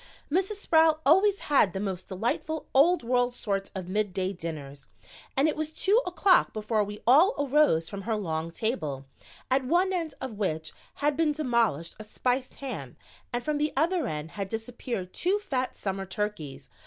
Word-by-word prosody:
Mrs. 380 +5 +1
Sproul 320 -5 +4
always 385 +7 +4
has 270 -10 +3
the 190 - -3
most 190 -2 -4
delightful 235 +10 -2
old 320 +4 +5
world 245 0 +1
sort 195 -4 -2
of 185 -2 -5
midday 190 -1 -1
dinners 145 -5 -7 0.5
and 275 +3 +4
it 310 - 0
was 310 0 -2
two 405 +8 +3
o'clock 365 +1 +3
before 215 0 0
we 205 +1 -8
all 320 - +6
arose 280 - +3
from 200 -1 -6
her 220 +2 -1
long 165 -5 -2
table, 155 - -3 0.5
at 265 +1 +3
one 355 +8 +2
end 335 -4 -2
of 225 -6 -6
which 160 -6 -2 0.3
had 295 -1 +3
been 310 -1 +2
demolished 235 - 0
a - - -6
spiced 250 +4 -2
ham 200 - -6 0.3
and 240 0 -2
from 300 +1 -1
the 300 +1 +1
other 330 -1 +2
end 155 -1 -4
had 200 -2 -5
disappeared 225 -4 -5
two 375 +4 +1
fat 260 -11 -3
summer 195 -1 -3
turkeys. 165 -9 -4
235 Hz, 170 wpm, -28 LUFS, 190-305 Hz, 0.5 s, all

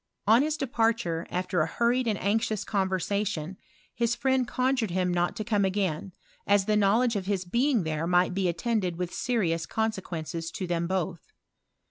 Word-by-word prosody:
On 225 +4 +6
his 305 +1 0
departure, 225 - 0
after 180 -1 -1
a 155 - +1
hurried 235 +7 +1
and 215 -3 +1
anxious 215 0 0
conversation, 190 -3 -1 0.4
his 235 -1 0
friend 260 -2 +1
con 255 +2 +1
jured 225 -6 -1
him 180 0 0
not 175 0 0
to 220 - -3
come 210 -2 +1
again, 190 -2 -1 0.4
as 200 -1 +4
the 215 0 +2
knowledge 215 +4 +3
of 190 -2 -3
nis 195 -2 -1
being 240 +3 +2
there 160 +1 -2
might 180 +1 +3
be 190 -1 +1
attended 185 0 -1
with 180 0 -4
serious 175 -10 0
con 220 0 0
sequences 165 -4 -5
to 190 - -3
them 170 -1 -1
both. 180 -3 -3
195 Hz, 175 wpm, -27 LUFS, 175-230 Hz, 0.4 s, On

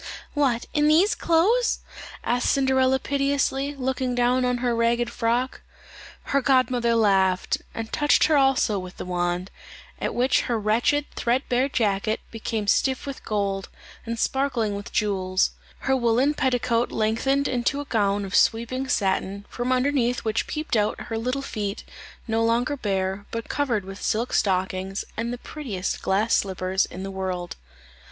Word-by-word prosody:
"What, 260 -5 +1
in 295 0 +3
these 340 +8 +5
clothes?" 400 +10 +2 0.4
said 245 - +1
Cinderella 265 0 +3
piteously, 275 +1 0
looking 260 -1 -1
down 250 +1 +2
on 250 0 +1
her 240 -1 0
ragged 235 +1 +1
frock. 240 +2 -1 0.6
Her 280 - +1
godmother 255 -3 +2
laughed, 190 -4 +2
and 225 -1 -5
touched 295 -1 +3
her 315 - +4
also 270 -7 +3
with 185 0 -9
the - - -6
wand; 175 +1 -2 0.5
at - - -2
which 255 +2 +3
her 235 -2 +1
wretched 235 +7 +2
thread 250 +3 0
bare 255 +3 +2
jacket 215 -3 0
became 220 -1 -3
stiff 260 +6 +1
with 275 -1 -7
gold, 200 -2 -2 0.3
and 230 0 -4
sparkling 245 -4 0
with 200 0 -6
jewels; 190 -3 +1 0.3
her 265 - +2
woollen 250 +3 +2
petticoat 245 -3 +1
lengthened 250 +6 +1
into 250 +3 0
a 290 - -4
gown 205 -4 +1
of 195 - -8
sweeping 240 +4 +2
satin, 195 -2 0
from 245 +1 -2
underneath 255 -2 +1
which 220 0 0
peeped 305 -4 -2
out 210 -1 +1
her 225 - -4
little 255 +4 -2
feet, 205 -6 -4 0.4
no 225 0 +1
longer 240 +5 +1
bare, 195 -4 -2
but 230 0 -5
covered 240 -9 0
with 195 +1 -9
silk 230 +3 -1
stockings, 190 0 0
and 230 +1 -2
the 245 - -4
prettiest 235 -10 -4
glass 205 +4 +1
slippers 190 0 +1
in 185 - -8
the 195 - -5
world. 185 -2 -4
235 Hz, 155 wpm, -24 LUFS, 200-265 Hz, 0.6 s, these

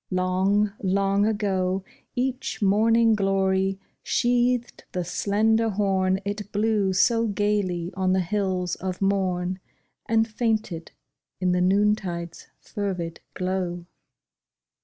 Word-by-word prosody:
Long, 190 +3 +1
long 195 +1 +2
ago 190 -3 0 0.3
Each 255 +1 -2
morning 225 +3 +4
glory 195 -1 +1 0.2
sheathed 245 0 +1
the 180 - -1
slender 220 +5 +1
horn 190 -2 +1
It 205 0 -4
blew 210 -2 +1
so 230 +5 +3
gayly 200 -4 -1
on 185 0 +1
the 190 - +2
hills 185 -1 -1
of 185 -1 -4
morn, 185 -2 0 0.5
And 225 0 +3
fainted 215 -7 -2 0.5
in 180 -1 +1
the 180 0 +2
noontide's 185 -3 0
fervid 180 -5 -4 0.2
glow. 180 -2 -2
195 Hz, 105 wpm, -25 LUFS, 185-210 Hz, 0.5 s, morning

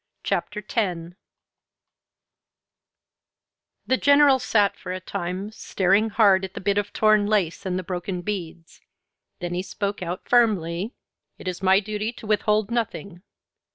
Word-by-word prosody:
CHAPTER 210 - -2
X 175 -6 -2 2.7
The 260 - +2
General 285 -1 +5
sat 205 -5 +2
for 180 - -8
a 185 - -3
time 185 +2 -4
staring 200 0 +1
hard 200 -3 +4
at 190 -1 -6
the - - -4
bit 200 +1 +1
of 205 0 -4
torn 215 -1 +3
lace 200 -2 0
and 180 -1 -1
the 185 - -3
broken 180 0 -4
beads. 170 -4 -6 0.6
Then 175 0 -3
he 180 - -1
spoke 200 +1 -4
out 175 +1 -5
firmly: 205 -4 +2 0.4
"It - - -10
is 180 0 -4
my 190 0 +5
duty 210 +2 -3
to 225 - -12
withhold 210 0 +1
nothing. 200 -6 -3
200 Hz, 140 wpm, -24 LUFS, 180-215 Hz, 2.7 s, General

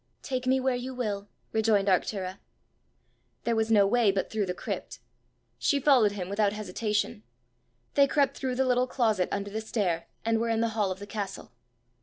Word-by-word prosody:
"Take 255 -2 -3
me 260 +1 +4
where 260 -1 +1
you 255 +1 -5
will," 205 -5 -3 0.2
rejoined 215 -3 +2
Arctura. 190 0 0 1.0
There 235 - +1
was 220 0 +1
no 205 -2 +6
way 220 0 +4
but 195 -1 -2
through 210 -3 0
the 180 - -1
crypt: - - -5 0.6
she 285 - +2
followed 250 -7 +4
him 185 -3 -4
without 200 +1 +1
hesitation. 210 - -2 0.7
They 280 -1 +5
crept 280 -1 +2
through 260 -2 -2
the 265 +1 +2
little 250 0 +2
closet 220 -8 +1
under 200 0 -3
the 220 +2 -3
stair, 185 -7 -1 0.2
and 225 0 +2
were 230 +1 0
in 225 -1 +1
the 230 - +2
hall 215 -3 0
of 185 - -3
the 200 - -8
castle. 205 -2 -5
220 Hz, 185 wpm, -28 LUFS, 200-250 Hz, 1.0 s, no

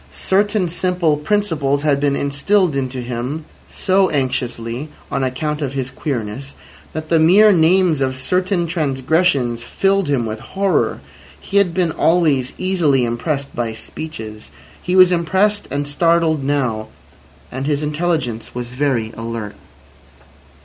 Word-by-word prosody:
Certain 205 0 +1
simple 175 -2 0
principles 150 -5 0
had 145 -2 +2
been 140 -1 +1
instilled 150 +5 +1
into 130 -1 -2
him 125 +6 -4 0.2
so 190 0 +2
anxiously 125 -1 -2 0.2
(on 135 - 0
account 150 +4 -2
of 135 -2 -2
his 130 -2 -3
"queerness") 130 -1 -4 0.4
that 155 0 -5
the 165 - +4
mere 195 +7 +6
names 170 -3 +3
of 130 -1 0
certain 180 +5 0
transgressions 140 -5 0
filled 195 +6 +1
him 135 -5 +1
with 110 0 -4
horror. 195 - 0 0.4
He 200 - -2
had 200 -3 +4
been 180 -3 +1
always 155 -7 +2
easily 165 -9 +2
impressed 140 +4 -3
by 115 -2 -2
speeches. 110 -4 -8 0.3
He 180 - -1
was 185 -1 +7
impressed 190 +4 +1
and 145 0 -2
startled 165 0 +2
now, 125 -6 -1 0.6
and 135 +2 -4
his 150 0 0
intelligence 150 -8 -2
was 120 0 -5
very 125 -4 -1
alert. 115 -2 -5
145 Hz, 135 wpm, -19 LUFS, 130-175 Hz, 0.6 s, was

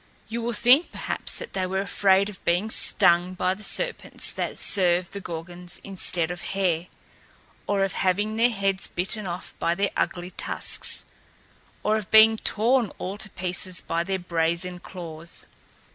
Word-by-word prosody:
You 230 +1 -4
will 235 +1 -2
think, 250 +9 +5
perhaps, - - -1
that 485 - -8
they 185 -1 -1
were 190 +1 -1
afraid 195 0 +3
of 205 -2 -10
being 180 +6 +1
stung 180 -3 +3
by 185 0 +1
the 200 - -11
serpents - - -1
that - - -4
served 180 -2 +3
the 200 - -4
Gorgons 175 +1 -6
instead 180 -3 -1
of 175 - -6
hair 180 -3 -1 0.8
or 200 -1 +1
of 195 - -1
having 205 +3 0
their 235 +2 +4
heads 195 -4 -1
bitten 195 +3 -2
off 175 +1 -6
by 170 - +1
their 200 +2 0
ugly 180 0 -2
tusks - - -1 0.8
or 215 +1 +2
of 210 -3 -6
being 220 0 +7
torn 230 +1 +1
all 195 +3 -5
to 215 - -2
pieces 180 0 +1
by 165 0 -2
their 190 +2 -2
brazen 170 0 -1
claws. 170 -3 -8
190 Hz, 160 wpm, -25 LUFS, 175-210 Hz, 0.8 s, being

